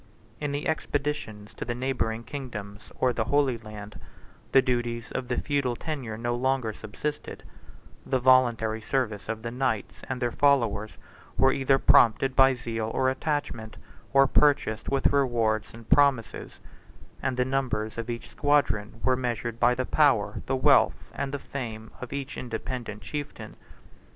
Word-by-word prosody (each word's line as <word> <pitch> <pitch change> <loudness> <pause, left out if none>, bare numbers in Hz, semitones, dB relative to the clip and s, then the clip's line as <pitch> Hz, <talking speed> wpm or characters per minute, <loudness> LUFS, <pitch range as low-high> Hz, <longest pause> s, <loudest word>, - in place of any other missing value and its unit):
In 145 -1 -2
the 145 +1 -2
expeditions 145 -9 -3
to - - -6
the 120 0 -3
neighboring 120 -3 -1
kingdoms 110 -6 -8
or 125 -1 +1
the 115 -1 -1
Holy 135 -2 +2
Land, 105 -1 -10 0.5
the 135 - +7
duties 120 -2 -1
of 125 - -3
the 125 - -1
feudal 140 -4 0
tenure 130 -7 -5
no 120 +1 -1
longer 130 -2 0
subsisted; 110 +9 -6 0.6
the 130 - 0
voluntary 120 -4 +3
service 110 -4 -2
of 110 -1 -3
the 115 - -4
knights 125 -4 -2
and 130 -1 -2
their 120 -1 0
followers 115 -8 +2 0.4
were 135 - +5
either 135 0 +3
prompted 130 +1 +4
by 135 -1 +6
zeal 115 -2 -3
or 130 +2 +2
attachment, 130 -6 -3 0.3
or 135 0 +6
purchased 135 -6 +2
with 135 -1 0
rewards 115 -6 +1
and 115 -1 -13
promises; 140 -5 +2 0.6
and 130 -1 -1
the 125 - +2
numbers 120 -5 -1
of 115 +1 -5
each 115 -1 -5
squadron 115 -7 +1
were 130 0 +3
measured 120 -2 -3
by 125 +1 +4
the 130 +1 -1
power, 120 -10 +2
the 135 - +1
wealth, 130 - +3
and 140 -1 -3
the 145 - -2
fame, 115 -6 -6
of 125 - -7
each 140 -1 -5
independent 115 -3 -5
chieftain. 145 +9 -6
125 Hz, 155 wpm, -27 LUFS, 110-135 Hz, 0.6 s, the